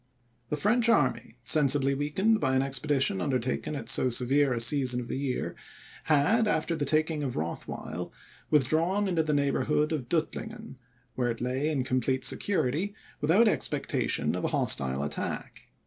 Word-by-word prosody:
The 150 - -1
French 230 +7 +2
army, 130 - +1
sensibly 140 0 +4
weakened 190 +11 +1
by 130 -6 +1
an 130 - +2
expedition 135 -6 0
undertaken 130 +4 -2
at 120 -6 -6
so 130 +1 +2
severe 130 +3 +2
a 120 - -1
season 125 0 +3
of 120 - -6
the - - -4
year, 135 -2 -3 0.5
had, 185 +10 +3
after 165 -4 0
the 145 -2 -2
taking 155 +1 +1
of 135 -4 -3
Rothweil, 80 +2 -5 0.4
withdrawn 160 +8 +2
into 175 -4 +1
the 155 -2 0
neighbourhood 150 +2 +1
of 135 -7 -3
Duttlingen, 220 - -3 0.4
where 125 -1 -1
it 115 - -3
lay 130 +5 -1
in 140 -4 -1
complete 130 +1 0
security, 185 +4 0 0.2
without 185 +10 +4
expectation - - -1
of - - -4
a - - +1
hostile 65 0 0
attack. 75 0 -5
145 Hz, 155 wpm, -28 LUFS, 130-160 Hz, 0.5 s, sensibly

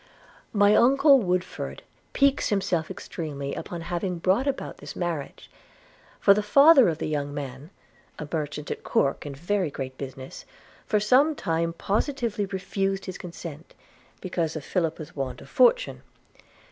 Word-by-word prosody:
'My 205 0 +4
uncle 275 +3 +6
Woodford 180 -4 -3 0.3
piques 275 -1 +2
himself 185 -6 0
extremely 150 -7 -5
upon 170 -1 -6
having 175 +1 -3
brought 190 +10 +1
about 275 - -3
this - - -9
marriage; 170 -5 -4 0.7
for 200 - +6
the 210 - 0
father 275 - +7
of 160 - -2
the - - -3
young 145 -2 -2
man 140 +1 -6 0.5
(a 150 - -6
merchant 150 -1 -3
at - - -5
Corke 140 +1 0
in 140 - -6
very 180 +3 -1
great 130 -2 -7
business) 130 -1 -8 0.4
for 210 - +2
some 265 +9 +4
time 165 -5 -1
positively 210 - -1
refused 195 0 -2
his 185 - -7
consent, 170 -2 -9 0.5
because 170 -4 -2
of 155 - -6
Philippa's 160 -3 -2
want 135 -3 -4
of - - -14
fortune. - - +3
180 Hz, 145 wpm, -26 LUFS, 150-210 Hz, 0.7 s, father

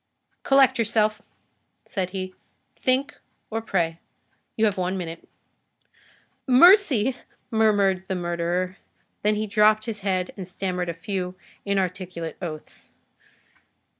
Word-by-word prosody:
"Collect 270 -2 +4
yourself," 215 -2 +1 0.6
said 185 -2 -3
he. 185 0 -5 0.4
"Think 260 +2 0 0.3
or 225 +1 -2
pray. 170 -6 -1 0.6
You 220 - +3
have 205 -2 +1
one 185 +1 -1
minute." 165 -2 -7 1.2
"Mercy!" 265 - +6 0.4
murmured 200 -4 +2
the 190 - -2
murderer; 175 +1 -2 0.4
then 210 +1 +2
he 215 +1 -1
dropped 215 +1 +3
his 225 -3 -4
head 185 -2 -1
and 190 -3 -7
stammered 180 -1 -3
a 170 - -4
few 180 +1 -4 0.3
inarticulate 185 -4 -2
oaths. 155 -4 -8
195 Hz, 110 wpm, -24 LUFS, 180-215 Hz, 1.2 s, Mercy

